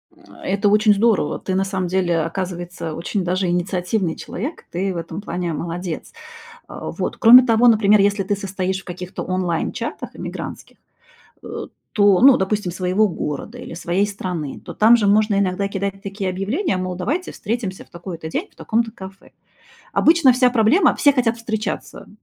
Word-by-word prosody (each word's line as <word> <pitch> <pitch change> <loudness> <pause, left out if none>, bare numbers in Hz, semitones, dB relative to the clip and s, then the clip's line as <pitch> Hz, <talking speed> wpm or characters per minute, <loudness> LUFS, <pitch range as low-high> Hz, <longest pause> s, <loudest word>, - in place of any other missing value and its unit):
Э, - - -23 0.2
это 200 +2 +1
очень 210 0 +5
здорово, 220 +1 +1
ты 185 - -3
на 195 - +2
самом 190 -2 -2
деле, 175 -2 +1
оказывается, 175 -1 -4
очень 180 +3 -2
даже 185 +1 0
инициативный 180 +1 -1
человек, 265 - -6
ты 190 +2 -1
в - - -5
этом 165 +4 -6
плане 175 -3 -3
молодец. 170 +1 -5 0.5
А, - - -7
вот. - - -4
Кроме 245 +2 +9
того, 235 0 +4
например, 210 -2 +5
если 200 0 +2
ты 200 +2 -1
состоишь 190 -1 -3
в - - -25
каких-то 180 +1 -6
онлайн 180 -3 -1
чатах - - -5
иммигрантских, - - -7 0.7
э, - - -6 0.3
то 205 -3 +4
ну, 265 0 +8
допустим, 190 -2 -1
своего 185 +4 +1
города 170 - -5
или 245 - -9
своей 175 +4 0
страны, 180 -7 -5
то - - -9
там 225 +3 +6
же 205 - +1
можно 210 0 +3
иногда 195 0 0
кидать 195 0 -4
такие 195 -1 -4
объявления, 200 - -1
мол, 185 0 -3
давайте 275 - -3
встретимся 210 -4 -4
в - - -32
такой-то 170 -2 -7
день 320 - -3
в - - -30
таком-то 225 0 -1
кафе. 190 -2 -12 0.6
Обычно 320 -5 +5
вся 250 0 +3
проблема 245 - +3
все 285 -2 +5
хотят 240 -3 +1
встречаться, 220 -1 -5
195 Hz, 170 wpm, -20 LUFS, 180-220 Hz, 0.7 s, Кроме